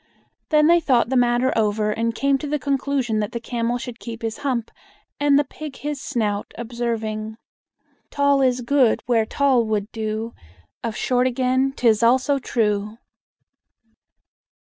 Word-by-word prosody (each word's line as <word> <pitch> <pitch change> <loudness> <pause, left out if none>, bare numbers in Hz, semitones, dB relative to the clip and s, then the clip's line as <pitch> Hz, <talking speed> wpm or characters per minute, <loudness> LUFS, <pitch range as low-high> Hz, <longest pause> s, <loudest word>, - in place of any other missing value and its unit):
Then 300 -1 +4
they 340 +2 +6
thought 250 -7 +2
the 265 - 0
matter 245 +1 +2
over, 215 -1 +1
and 230 +1 -1
came 275 +1 +1
to 295 - -5
the 300 +1 0
conclusion 275 -5 -1
that 210 -1 -3
the 235 - -2
camel 235 0 -2
should 245 -1 -8
keep 230 0 -8
his 225 0 -3
hump 250 -5 -2 0.5
and 290 -1 +4
the 290 - +4
pig 290 0 -9
his 290 -1 -5
snout, 210 -8 -2
observing: 225 -2 -3 0.7
"Tall 280 -1 +2
is 255 -1 +2
good, 250 -1 +2
where 225 -3 +2
tall 270 -3 +2
would 210 -1 -2
do; 220 0 -4 0.5
Of 230 -2 -3
short, 250 +2 +1
again, 260 +1 +1
't 245 - +2
is 220 -1 +4
also 260 +4 +3
true!" 210 -3 -1
240 Hz, 155 wpm, -22 LUFS, 225-270 Hz, 0.7 s, they